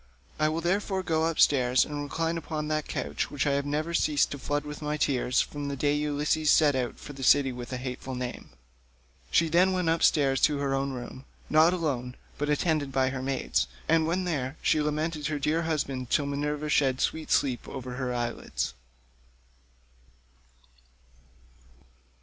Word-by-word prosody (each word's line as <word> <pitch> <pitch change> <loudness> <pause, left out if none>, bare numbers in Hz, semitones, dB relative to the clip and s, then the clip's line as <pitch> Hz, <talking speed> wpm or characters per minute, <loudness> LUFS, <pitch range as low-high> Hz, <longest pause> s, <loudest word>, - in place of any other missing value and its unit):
I 155 0 +3
will 160 +2 -2
therefore 190 +2 0
go 160 -2 +1
upstairs 130 -6 +3
and 145 -1 -5
recline 165 +3 -2
upon 155 -2 -4
that 155 -1 -1
couch - - -3
which 145 - -2
I 145 - +2
have 140 0 0
never 155 +3 -2
ceased 150 -3 +2
to 140 - -5
flood 145 +2 -1
with 150 +1 -7
my 150 0 -2
tears 125 -4 +1
from 145 -1 -5
the 140 - -3
day 145 +2 +1
Ulysses 150 +1 0
set 150 -2 +5
out 125 -2 -2
for 145 - -10
the 135 - -10
city 135 +1 +4
with 125 0 -7
a 130 - -2
hateful 130 +1 -5
name." 125 0 -5 0.8
She 165 - +3
then 180 +4 +3
went 180 -3 0
upstairs 145 -5 +3
to 150 -2 +3
her 140 -1 -1
own 135 0 -1
room, 130 +1 -8 0.3
not 155 +2 +6
alone, 135 -8 -2 0.2
but 145 0 -1
attended 150 -1 +1
by 130 0 +2
her 130 -1 -4
maidens, 135 0 0 0.2
and 160 0 +3
when 180 +3 0
there, 145 -5 -2
she 155 - +3
lamented 150 0 -1
her 150 - -2
dear 150 +3 0
husband 140 -6 -2
till 145 - +2
Minerva 150 +1 -2
shed 135 -3 +2
sweet 160 -1 -1
sleep 130 -4 +1
over 125 -1 -6
her 130 -1 -2
eyelids. 120 - -3
145 Hz, 175 wpm, -28 LUFS, 135-155 Hz, 0.8 s, not